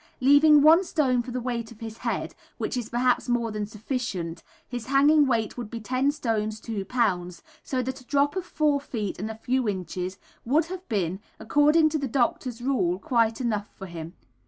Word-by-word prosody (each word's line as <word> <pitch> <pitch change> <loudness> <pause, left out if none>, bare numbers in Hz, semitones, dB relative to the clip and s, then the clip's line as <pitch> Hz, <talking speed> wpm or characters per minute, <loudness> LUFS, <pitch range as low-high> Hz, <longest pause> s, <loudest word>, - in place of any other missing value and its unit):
Leaving 285 +2 +6
1 325 +5 +7
stone 270 -9 +1
for 240 - -8
the 250 +1 -3
weight 235 -2 -3
of 225 - -14
his 225 -1 -8
head, - - -2 0.2
which - - -3
is 240 -3 -3
perhaps 245 +1 +1
more 235 -2 +1
than 210 -1 -3
sufficient, 210 -6 -4 0.3
his 245 -2 -6
hanging 285 +2 +5
weight 230 -3 0
would 235 -3 -5
be 230 - -5
10 255 +5 +1
stones 220 -6 -2
2 210 -3 -4
lbs, 185 -7 -1 0.2
so 255 -2 -2
that 260 +1 -5
a - - -19
drop 285 +2 +2
of 375 - -2
4 305 -4 +1
feet 215 -10 -4
and 215 +3 -3
a 220 - -5
few 250 +3 -1
inches[B] 185 -2 -3 0.3
would 300 +7 +2
have 370 +2 -8
been, 190 -4 -1 0.2
according 300 +6 +4
to 310 0 -1
the 275 - -2
doctor's 245 -1 -1
rule, 190 -10 +1
quite 225 +2 +1
enough 215 -5 -1
for 195 - -7
him. 170 -2 -8
240 Hz, 195 wpm, -26 LUFS, 215-275 Hz, 0.3 s, 1